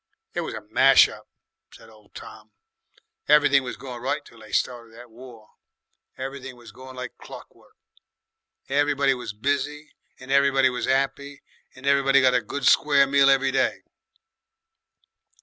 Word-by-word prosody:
"It - - -2
was - - -6
a - - -9
smash - - +5
up," - - -13 0.4
said 115 - -16
old 105 -1 -23
Tom. - - -13 0.7
"Everything 145 -2 +4
was 125 -1 -7
going 125 -2 -9
right 135 +4 -1
until 145 - -17
they - - -15
started 115 -2 -3
that 120 0 -14
War. 115 -2 -14 0.7
Everything 135 -1 -7
was 120 -3 -15
going 130 +4 -13
like 125 -1 -8
clock - - -12
work. - - -25 0.9
Everybody 140 -1 +1
was 125 -4 -7
busy 145 +6 -3 0.3
and 130 +1 -10
everybody 135 -1 +3
was 125 - -4
'appy 135 +1 -2 0.3
and 130 +1 -13
everybody 140 0 +3
got 130 -1 +3
a 125 - +2
good 130 +5 -6
square 140 -2 +4
meal 140 0 +3
every 135 0 +2
day." 130 0 -1
135 Hz, 150 wpm, -23 LUFS, 125-140 Hz, 0.9 s, smash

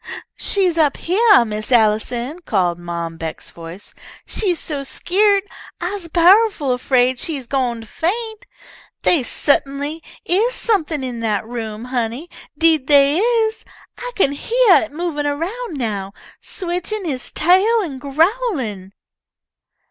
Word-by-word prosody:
"She's 365 -5 +1
up 295 -3 +3
heah, 405 - +4
Miss 215 +1 -5
Allison," 235 +6 +1
called 180 - 0
Mom 170 -1 -5
Beck's 160 -1 -7
voice. 170 +4 -10 0.3
"She's 370 -5 -1
so 290 -3 -4
skeered, 395 +8 +2 0.4
I'se 360 0 -4
pow'ful 345 - +4
'fraid 255 -1 +2
she 315 -5 -3
gwine 245 -3 -1
to - - -11
faint. 440 - -3 0.6
They 335 - +3
sut'nly 280 +4 -1 0.2
is 430 +8 +1
something 325 - 0
in 245 -2 -5
that 215 -2 -1
room, 225 -1 -6
honey, 250 +5 -3 0.3
deed 320 -5 +3
they 285 +2 +5
is. 450 0 +1 0.4
I - - -5
kin 280 -8 +2
heah 450 +6 +3
it - - -15
movin' 300 -2 -3
around 335 +6 -4
now, 200 -6 -3 0.3
switchin' 370 +2 -4
he's 270 -5 -4
tail 380 +8 +3
an' 280 -7 -6
growlin'!" 280 - -1
295 Hz, 125 wpm, -19 LUFS, 240-380 Hz, 0.6 s, they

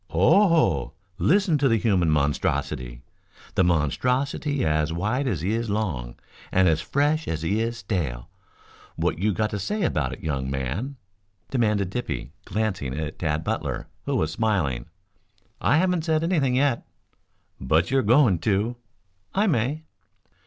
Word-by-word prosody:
"Oho! 165 - +3 0.3
Listen 185 -4 +3
to 135 -1 +3
the 115 - +3
human 95 -7 +2
monstrosity 70 -4 -1 0.5
the - - +3
monstrosity 125 - 0
as 75 0 +1
wide 110 +11 -1
as 95 - -1
he 95 +5 0
is 115 0 -1
long 80 - -2 0.4
and 95 0 +4
as 80 -1 +2
fresh 150 +3 0
as 80 -1 -2
he 100 +6 +1
is 115 0 -2
stale. 85 - -3 0.7
What - - -1
you 105 +3 +2
got 110 +2 -1
to 105 - -3
say 210 - -2
about 75 - 0
it, - - -8
young 70 -4 -2
man?" 70 - -3 0.6
demanded 105 -7 +1
Dippy, 80 - -4
glancing 95 -12 -2
at 80 -1 -4
Tad 80 -1 -1
Butler, - - -3 0.2
who - - -1
was 80 0 0
smiling. 80 - 0 0.7
"I 145 - +3
haven't 180 -2 +1
said 160 -1 +1
anything 150 -8 +1
yet." 135 -2 +2 0.8
"But 80 - +1
you're 135 0 +3
going 115 - +4
to?" 110 +4 0 0.6
"I 200 +2 +3
may." 145 - 0
105 Hz, 145 wpm, -25 LUFS, -, 0.8 s, and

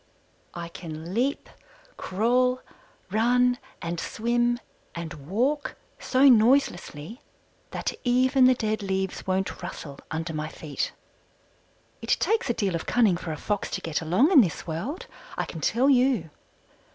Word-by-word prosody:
I 170 -1 -5
can 165 0 -8
leap, 260 +6 0 0.5
crawl, 250 +6 +1 0.5
run, 245 +3 +3 0.2
and 170 0 -3
swim, 240 +3 0 0.4
and 170 -1 -5 0.2
walk 270 +9 0 0.2
so 265 +2 +4
noiselessly 230 - +3 0.5
that - - -3
even 255 +1 +4
the 255 0 +6
dead 215 -2 -1
leaves 190 -1 -2
won't 190 +1 -1
rustle 140 -3 -7
under 160 +1 -3
my 155 0 -3
feet. 155 -2 -4 1.1
It - - +1
takes 440 - +1
a - - +3
deal 195 -4 0
of 165 - -3
cunning 220 -7 +4
for 170 -1 -5
a 155 - -4
Fox 205 +4 -2
to - - -3
get 165 -1 -2
along 185 - +3
in 300 -8 +9
this 180 -8 -2
world, 185 - -4 0.3
I - - 0
can 165 - -8
tell 245 - +2
you. 250 - +3
215 Hz, 140 wpm, -26 LUFS, 170-250 Hz, 1.1 s, in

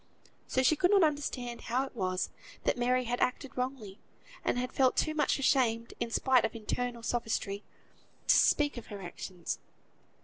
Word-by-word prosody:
So 260 - +1
she 285 +5 +5
could 355 +4 +3
not 395 -2 +6
understand 270 -6 -1
how 255 +3 0
it 265 - -12
was 185 -3 -1 0.3
that - - +2
Mary 250 +1 +2
had 245 0 -2
acted 255 +1 -1
wrongly, 250 -6 -4 0.4
and - - +1
had 250 +1 -2
felt 260 -2 +3
too 310 - +2
much 310 - +2
ashamed, 240 -4 +2
in 235 - -1
spite 255 +2 +3
of - - -1
all - - -5
internal 240 +2 -3
sophistry, 220 -4 -2 0.6
to - - +7
speak 290 -3 +4
of 240 - -7
her 200 -2 -7
actions. 175 0 -5
245 Hz, 175 wpm, -31 LUFS, 230-265 Hz, 0.6 s, to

